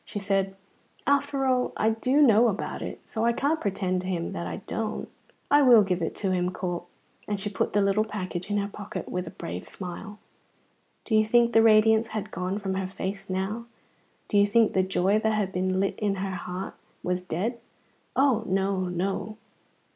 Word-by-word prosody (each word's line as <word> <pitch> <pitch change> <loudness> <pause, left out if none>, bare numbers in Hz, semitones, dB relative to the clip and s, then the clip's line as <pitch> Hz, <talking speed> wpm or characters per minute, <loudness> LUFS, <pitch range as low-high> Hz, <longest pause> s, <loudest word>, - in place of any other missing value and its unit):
She - - -7
said: 195 -1 0 0.5
"After 280 -1 +1
all, 255 -1 +1
I 220 +1 +3
do 255 +6 +3
know 235 -2 +6
about 205 -3 -3
it, - - -5
so 220 - -3
I 235 0 +3
can't 290 +6 0
pretend 190 -3 -1
to 185 - -6
him 175 -3 -2
that 85 0 -4
I 85 - -4
don't. 220 -1 -3 0.4
I 290 +1 +7
will 240 -6 +7
give 185 -2 -1
it 165 - -2
to 195 -2 -1
him, 180 -1 +1
Corp"; 175 -1 -4 0.4
and 205 -1 -2
she 205 +1 -3
put - - -1
the 205 - +3
little 200 +2 +3
package 185 -4 -5
in 205 - +1
her 200 0 0
pocket 205 0 -7
with 180 -1 -3
a - - -4
brave 90 +2 -7
smile. 190 +3 -7 0.9
Do 225 - -3
you 215 0 +6
think 235 +2 +3
the 225 - +7
radiance 220 0 +5
had 215 -2 -5
gone 185 +2 -2
from 195 -2 -3
her 190 0 -2
face 195 +1 -5
now? 195 +5 -2 0.6
Do 205 - +3
you 200 - +5
think 225 +2 +3
the 190 - +3
joy 190 +2 +2
that 220 0 +1
had 205 -3 0
been 185 0 0
lit 195 0 -1
in 205 -2 0
her 195 0 -3
heart 180 +1 -5 0.3
was 180 0 -1
dead? 195 +7 -3 0.6
Oh, 265 -5 +3
no, 190 0 0
no! 190 +4 -2
200 Hz, 200 wpm, -27 LUFS, 185-220 Hz, 0.9 s, I